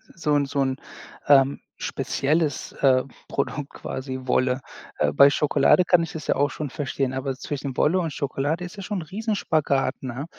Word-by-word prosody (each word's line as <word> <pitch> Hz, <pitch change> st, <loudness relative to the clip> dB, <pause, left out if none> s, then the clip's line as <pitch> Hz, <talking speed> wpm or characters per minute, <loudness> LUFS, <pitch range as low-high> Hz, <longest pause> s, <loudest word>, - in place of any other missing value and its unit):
so 155 Hz, -3 st, -1 dB
'n 140 Hz, -1 st, +2 dB
so 140 Hz, +1 st, -2 dB
'n, 130 Hz, -1 st, +1 dB, 0.5 s
ähm, 140 Hz, -1 st, +5 dB, 0.2 s
spezielles, 150 Hz, 0 st, -1 dB
äh, 130 Hz, -2 st, +3 dB, 0.3 s
Produkt 140 Hz, +1 st, -2 dB
quasi, 130 Hz, 0 st, -5 dB
Wolle. 130 Hz, +1 st, +1 dB, 0.4 s
Äh, 75 Hz, -1 st, +1 dB
bei 140 Hz, -, +8 dB
Schokolade 150 Hz, +5 st, +3 dB
kann 175 Hz, -2 st, +4 dB
ich 165 Hz, -, -7 dB
es 155 Hz, -, -6 dB
ja -, -, +2 dB
auch 145 Hz, +1 st, +2 dB
schon 150 Hz, -3 st, -4 dB
verstehen, 135 Hz, -2 st, -2 dB
aber 135 Hz, +1 st, -2 dB
zwischen 140 Hz, -1 st, -5 dB
Wolle 180 Hz, +5 st, +3 dB
und 165 Hz, -3 st, -2 dB
Schokolade 145 Hz, +5 st, -2 dB
ist 180 Hz, +4 st, -10 dB
es 195 Hz, -, -6 dB
schon 205 Hz, -3 st, -2 dB
ein -, -, -4 dB
Riesen-Spagat, 160 Hz, -8 st, 0 dB
ne? 130 Hz, +2 st, -4 dB
140 Hz, 180 wpm, -24 LUFS, 135-160 Hz, 0.5 s, bei